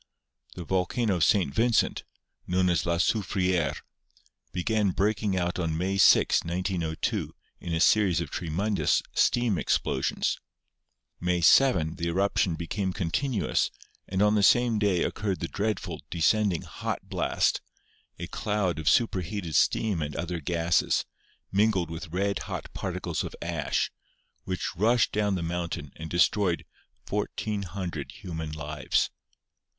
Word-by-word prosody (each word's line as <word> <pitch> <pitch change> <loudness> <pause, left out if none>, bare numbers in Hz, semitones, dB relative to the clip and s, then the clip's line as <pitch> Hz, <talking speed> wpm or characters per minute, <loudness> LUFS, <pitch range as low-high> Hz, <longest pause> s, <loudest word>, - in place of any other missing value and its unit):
The 90 - -6
volcano 95 +4 0
of 85 - +2
St. 90 -9 +3
Vincent, 115 +4 +2 0.4
known 90 0 +2
as 85 - 0
La 85 0 +1
Soufriere, 90 -3 0 0.7
began 105 +3 +1
breaking 100 +1 0
out 90 0 -1
on 80 -3 -1
May 95 +3 -1
6, - - +5
1902, 85 -2 -2 0.2
in 85 - -6
a 80 - 0
series 95 -2 +4
of 85 -4 -4
tremendous 90 +5 0
steam 120 -7 +2
explosions; - - 0 0.8
May 90 0 0
7 85 - +4
the 85 - -2
eruption 95 0 +1
became 95 +4 -3
continuous 105 - 0 0.4
and 95 +1 +1
on 105 0 +4
the 105 - +3
same 120 +2 +4
day 100 -4 +2
occurred 100 -3 -2
the 85 - -3
dreadful, 105 +4 -3
descending 95 +1 +2
"hot - - -5
blast," - - 0 0.6
a - - -5
cloud 100 -6 -1
of 80 - +2
superheated 95 -5 0
steam 100 -2 +2
and 75 -1 -4
other 85 0 -3
gases, 85 +1 +1 0.5
mingled 95 -4 +2
with 85 +2 -6
red 100 +4 -1
hot - - -5
particles - - -3
of - - -6
ash, - - -1 0.5
which 90 -2 -3
rushed 110 +5 +3
down 105 -2 +1
the 90 - -2
mountain 85 -3 -3
and 80 0 -7
destroyed 90 +1 +2 0.4
1,400 95 -7 -3
human 80 -5 -6
lives. 75 -1 -1
90 Hz, 130 wpm, -27 LUFS, 85-105 Hz, 0.8 s, 6